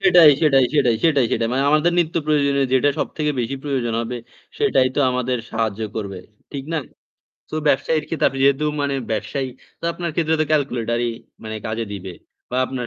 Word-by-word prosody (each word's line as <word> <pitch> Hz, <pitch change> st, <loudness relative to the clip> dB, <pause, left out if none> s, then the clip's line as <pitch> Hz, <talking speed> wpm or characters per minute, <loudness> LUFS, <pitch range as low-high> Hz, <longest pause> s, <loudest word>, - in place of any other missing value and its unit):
সেটাই, 180 Hz, -5 st, +8 dB
সেটাই, 135 Hz, -4 st, +5 dB
সেটাই, 125 Hz, -5 st, +4 dB
সেটাই, 145 Hz, -6 st, +4 dB
সেটাই। 115 Hz, -, +1 dB
মানে 130 Hz, +2 st, +1 dB
আমাদের 155 Hz, +3 st, +3 dB
নিত্য 170 Hz, -2 st, +1 dB
প্রয়োজনীয় 140 Hz, -2 st, +2 dB
যেটা 145 Hz, +2 st, +4 dB
সব -, -, 0 dB
থেকে 150 Hz, -1 st, +1 dB
বেশি 130 Hz, +3 st, -2 dB
প্রয়োজন 130 Hz, -5 st, -1 dB
হবে। 120 Hz, +1 st, -4 dB, 0.4 s
সেটাই 135 Hz, -12 st, +3 dB
তো -, -, +1 dB
আমাদের 125 Hz, 0 st, -1 dB
সাহায্য 110 Hz, -2 st, -1 dB, 0.2 s
করবে। 100 Hz, -3 st, -4 dB, 0.3 s
ঠিক 135 Hz, -1 st, -5 dB
না? 165 Hz, -, +1 dB, 0.7 s
তো -, -, -7 dB
ব্যবসায়ীর 150 Hz, +2 st, +2 dB
ক্ষেত্রে 165 Hz, -, -1 dB
তাদের 135 Hz, -, +2 dB
যেহেতু 140 Hz, +2 st, +3 dB, 0.2 s
মানে 140 Hz, -1 st, 0 dB, 0.2 s
ব্যবসায়ী 110 Hz, +5 st, -2 dB, 0.3 s
তো -, -, -9 dB
আপনার 170 Hz, -1 st, -4 dB
ক্ষেত্রে 160 Hz, -1 st, +1 dB
তো -, -, +4 dB
calculator-ই 120 Hz, -5 st, 0 dB, 0.3 s
মানে 110 Hz, 0 st, -4 dB
কাজে 110 Hz, +1 st, -2 dB
দিবে 95 Hz, -1 st, -6 dB, 0.4 s
বা 125 Hz, -, -2 dB
আপনার 125 Hz, -2 st, -4 dB
135 Hz, 180 wpm, -21 LUFS, 120-150 Hz, 0.7 s, সেটাই